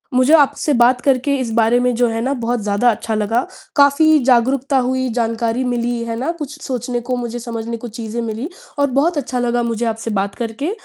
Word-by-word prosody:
मुझे 255 Hz, +4 st, +4 dB
आपसे 290 Hz, 0 st, +2 dB
बात 250 Hz, +1 st, +5 dB
करके, 275 Hz, +1 st, +1 dB
इस 235 Hz, -3 st, -3 dB
बारे 230 Hz, +1 st, +3 dB
में, 250 Hz, 0 st, +1 dB
जो 245 Hz, +1 st, +2 dB
है 225 Hz, 0 st, -2 dB
ना, 265 Hz, +4 st, 0 dB
बहुत 235 Hz, +1 st, -1 dB
ज़्यादा 205 Hz, +4 st, +2 dB
अच्छा 225 Hz, 0 st, -3 dB
लगा, 215 Hz, +3 st, +1 dB, 0.3 s
काफ़ी 300 Hz, +2 st, +5 dB
जागरूकता 260 Hz, +2 st, +2 dB
हुई, 260 Hz, +1 st, 0 dB
जानकारी 230 Hz, +1 st, -1 dB
मिली, 240 Hz, -1 st, -1 dB
है 230 Hz, 0 st, -3 dB
ना? 275 Hz, +7 st, -1 dB
कुछ 300 Hz, +1 st, -6 dB
सोचने 250 Hz, -2 st, -3 dB
को, 250 Hz, +1 st, -2 dB
मुझे 240 Hz, 0 st, -4 dB
समझने 230 Hz, -1 st, -5 dB
को 240 Hz, +1 st, -8 dB
चीज़ें 230 Hz, +1 st, -5 dB
मिली, 225 Hz, +5 st, -4 dB, 0.3 s
और 285 Hz, -, +3 dB
बहुत 330 Hz, +2 st, +1 dB
अच्छा 255 Hz, -2 st, -2 dB
लगा 240 Hz, 0 st, 0 dB
मुझे 235 Hz, 0 st, -2 dB
आपसे 225 Hz, 0 st, -3 dB
बात 200 Hz, 0 st, -2 dB
करके 235 Hz, -, -3 dB
245 Hz, 205 wpm, -18 LUFS, 230-265 Hz, 0.3 s, बात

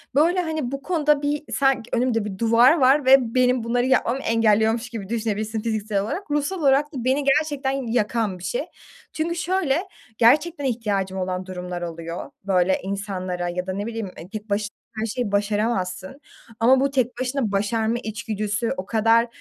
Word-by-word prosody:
Böyle, 345 Hz, +5 st, +4 dB
hani, 315 Hz, -6 st, -3 dB
bu 275 Hz, -, -4 dB
konuda 300 Hz, -4 st, +2 dB
bir 290 Hz, +1 st, -1 dB
sanki 270 Hz, -4 st, +1 dB
önümde 235 Hz, -3 st, +1 dB
bir 195 Hz, -2 st, -5 dB
duvar 235 Hz, -, +5 dB
var 270 Hz, 0 st, +4 dB
ve 265 Hz, -, +9 dB, 0.2 s
benim 250 Hz, -1 st, +3 dB
bunları 245 Hz, +2 st, 0 dB
yapmamı 260 Hz, 0 st, +2 dB
engelliyormuş 225 Hz, 0 st, +2 dB
gibi 210 Hz, -4 st, -7 dB
düşünebilirsin 220 Hz, -1 st, -2 dB
fiziksel 215 Hz, -2 st, -1 dB
olarak. 305 Hz, -, -5 dB
Ruhsal 295 Hz, +6 st, -1 dB
olarak 280 Hz, -1 st, +4 dB
da 250 Hz, -4 st, -4 dB
beni 265 Hz, +3 st, +1 dB
gerçekten 280 Hz, -1 st, +1 dB
yakan 230 Hz, -5 st, -1 dB
bir -, -, -12 dB
şey 240 Hz, -, -2 dB, 0.5 s
çünkü 330 Hz, +2 st, -2 dB
şöyle, 345 Hz, -4 st, 0 dB, 0.4 s
gerçekten 295 Hz, +6 st, +3 dB
ihtiyacım 205 Hz, -6 st, -1 dB
olan 185 Hz, 0 st, -3 dB
durumlar 180 Hz, -1 st, -6 dB
oluyor, 170 Hz, 0 st, -6 dB
böyle, 190 Hz, -1 st, +2 dB
insanlara 185 Hz, -3 st, -3 dB
ya 180 Hz, +1 st, -4 dB
da 185 Hz, -, -2 dB
ne 205 Hz, +2 st, -3 dB
bileyim, 225 Hz, -4 st, -4 dB
e, 175 Hz, -, -10 dB
tek 215 Hz, 0 st, -7 dB
baş 205 Hz, +1 st, -1 dB, 0.3 s
her 220 Hz, -, 0 dB
şeyi 230 Hz, -1 st, -3 dB
başaramazsın. 205 Hz, +2 st, -1 dB, 0.4 s
Ama 255 Hz, +3 st, +5 dB
bu 275 Hz, +1 st, +2 dB
tek 250 Hz, -2 st, 0 dB
başına 255 Hz, -4 st, -1 dB
başarma 220 Hz, +3 st, 0 dB
içgüdüsü 220 Hz, +1 st, -2 dB
o 185 Hz, -, -4 dB
kadar, 230 Hz, +2 st, +3 dB
230 Hz, 165 wpm, -23 LUFS, 205-270 Hz, 0.5 s, ve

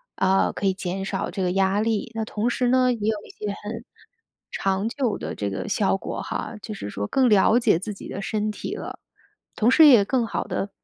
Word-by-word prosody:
啊， 190 Hz, 0 st, +2 dB
可 200 Hz, -, -1 dB
以 190 Hz, -, +2 dB
减 185 Hz, 0 st, -4 dB
少 195 Hz, 0 st, -3 dB
这 195 Hz, +2 st, -4 dB
个 180 Hz, -, +1 dB
压 195 Hz, +1 st, +2 dB
力。 225 Hz, 0 st, -1 dB
那 225 Hz, -, -1 dB
同 215 Hz, +1 st, -2 dB
时 250 Hz, +1 st, 0 dB
呢， 255 Hz, 0 st, +4 dB
也 230 Hz, -, -6 dB
有 220 Hz, -, 0 dB
一 -, -, -15 dB
些 210 Hz, -, -6 dB, 0.2 s
很 225 Hz, +2 st, -6 dB, 0.7 s
长 195 Hz, +2 st, 0 dB
久 245 Hz, -3 st, -1 dB
的 -, -, -5 dB
这 100 Hz, -1 st, -3 dB
个 95 Hz, -, -4 dB
效 195 Hz, -1 st, +1 dB
果 -, -, -5 dB
哈， -, -, -5 dB
就 215 Hz, 0 st, -6 dB
是 100 Hz, -, -6 dB
说 100 Hz, 0 st, -4 dB
更 265 Hz, -1 st, +3 dB
了 210 Hz, +2 st, +5 dB
解 230 Hz, -8 st, +3 dB
自 205 Hz, +2 st, -5 dB
己 -, -, -10 dB
的 195 Hz, -, -5 dB
身 215 Hz, +1 st, -1 dB
体 -, -, -5 dB
了。 -, -, -7 dB, 0.6 s
同 225 Hz, +3 st, +3 dB
时 310 Hz, +3 st, +8 dB
也 235 Hz, -8 st, +7 dB
更 245 Hz, 0 st, 0 dB
好 -, -, -2 dB
地 200 Hz, -, -3 dB
210 Hz, 245 characters per minute, -24 LUFS, 195-230 Hz, 0.7 s, 时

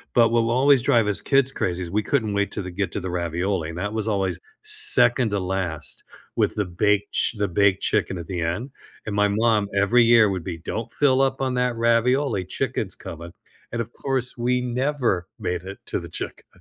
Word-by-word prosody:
but 115 Hz, -1 st, +5 dB
what 115 Hz, 0 st, +2 dB
will 115 Hz, -, -1 dB
always 140 Hz, -3 st, +4 dB
drive 115 Hz, -3 st, +2 dB
us 105 Hz, -, 0 dB
kids 135 Hz, -1 st, +2 dB
crazy 90 Hz, -5 st, -3 dB
is 85 Hz, -, -7 dB
we 105 Hz, -, 0 dB
couldn't 110 Hz, -7 st, -1 dB
wait 100 Hz, 0 st, -1 dB
till 105 Hz, -, -5 dB
the 90 Hz, -, -7 dB
get 95 Hz, +2 st, -3 dB
to -, -, -3 dB
the 95 Hz, -, -6 dB
ravioli, 85 Hz, 0 st, -2 dB
and 80 Hz, -, -8 dB
that 105 Hz, +3 st, -4 dB
was 110 Hz, -1 st, -3 dB
always 95 Hz, -5 st, -1 dB, 0.2 s
2nd 110 Hz, -, +7 dB
to 100 Hz, -, -1 dB
last 90 Hz, -4 st, -5 dB, 0.3 s
with -, -, 0 dB
the 105 Hz, -, -1 dB
baked 105 Hz, +3 st, 0 dB
ch -, -, 0 dB
the 100 Hz, -1 st, 0 dB
baked 100 Hz, +1 st, +1 dB
chicken 95 Hz, -, 0 dB
at 85 Hz, -, -7 dB
the 90 Hz, -3 st, -4 dB
end, 95 Hz, +12 st, -3 dB, 0.3 s
and 105 Hz, -, -4 dB
my 105 Hz, 0 st, +3 dB
mom, 105 Hz, -1 st, +1 dB
every 105 Hz, +5 st, +3 dB
year, 115 Hz, -2 st, +5 dB
would 95 Hz, -3 st, -4 dB
be, 90 Hz, -3 st, -6 dB
“Don't 110 Hz, +7 st, -6 dB
fill 135 Hz, -2 st, +2 dB
up 135 Hz, 0 st, 0 dB
on 130 Hz, -1 st, -1 dB
that 125 Hz, -1 st, 0 dB
ravioli, 115 Hz, -1 st, +1 dB
chicken's -, -, -4 dB
coming.” 85 Hz, +1 st, -10 dB, 0.4 s
And, 115 Hz, -, -4 dB
of 115 Hz, +1 st, -8 dB
course, 130 Hz, -2 st, -3 dB
we 125 Hz, +1 st, 0 dB
never 125 Hz, -, -1 dB
made 90 Hz, -1 st, -3 dB
it 95 Hz, +1 st, -9 dB
to -, -, -2 dB
the -, -, -10 dB
chicken. -, -, -8 dB
105 Hz, 215 wpm, -23 LUFS, 95-120 Hz, 0.4 s, 2nd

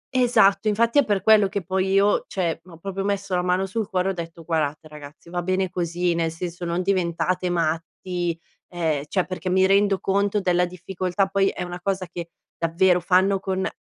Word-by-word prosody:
Esatto, 235 Hz, -4 st, +4 dB
infatti 230 Hz, +5 st, +3 dB
è -, -, +5 dB
per 200 Hz, -3 st, 0 dB
quello 215 Hz, -2 st, +6 dB
che 200 Hz, 0 st, -4 dB
poi 190 Hz, +2 st, -1 dB
io, 200 Hz, +1 st, +3 dB
cioè 170 Hz, -4 st, -2 dB
ho 175 Hz, -3 st, -13 dB
proprio 195 Hz, +3 st, -4 dB
messo 200 Hz, -1 st, -2 dB
la 180 Hz, -, +2 dB
mano 180 Hz, +1 st, +1 dB
sul 205 Hz, +2 st, -3 dB
cuore 185 Hz, 0 st, 0 dB
ho -, -, -1 dB
detto: 165 Hz, -1 st, -7 dB
"Guardate 155 Hz, -2 st, -2 dB
ragazzi 150 Hz, +2 st, -12 dB
va 175 Hz, 0 st, -2 dB
bene 185 Hz, +1 st, -1 dB
così 175 Hz, 0 st, -1 dB
nel 165 Hz, -1 st, 0 dB
senso 175 Hz, +1 st, -6 dB
non 170 Hz, +2 st, -1 dB
diventate 180 Hz, -1 st, 0 dB
matti." 170 Hz, +1 st, -2 dB, 0.3 s
Ehm, 160 Hz, -5 st, -2 dB
cioè 185 Hz, +3 st, 0 dB
perché 185 Hz, 0 st, -4 dB
mi 190 Hz, +1 st, +4 dB
rendo 195 Hz, +1 st, +3 dB
conto 200 Hz, +1 st, +1 dB
della 180 Hz, -2 st, +2 dB
difficoltà 180 Hz, +1 st, -2 dB
poi 195 Hz, 0 st, +1 dB
è 180 Hz, -, -3 dB
una 175 Hz, 0 st, -7 dB
cosa 190 Hz, 0 st, -1 dB
che 170 Hz, -1 st, -7 dB, 0.3 s
davvero 175 Hz, +2 st, +2 dB
fanno 190 Hz, +2 st, +3 dB
con 190 Hz, 0 st, -2 dB
185 Hz, 190 wpm, -23 LUFS, 170-195 Hz, 0.3 s, quello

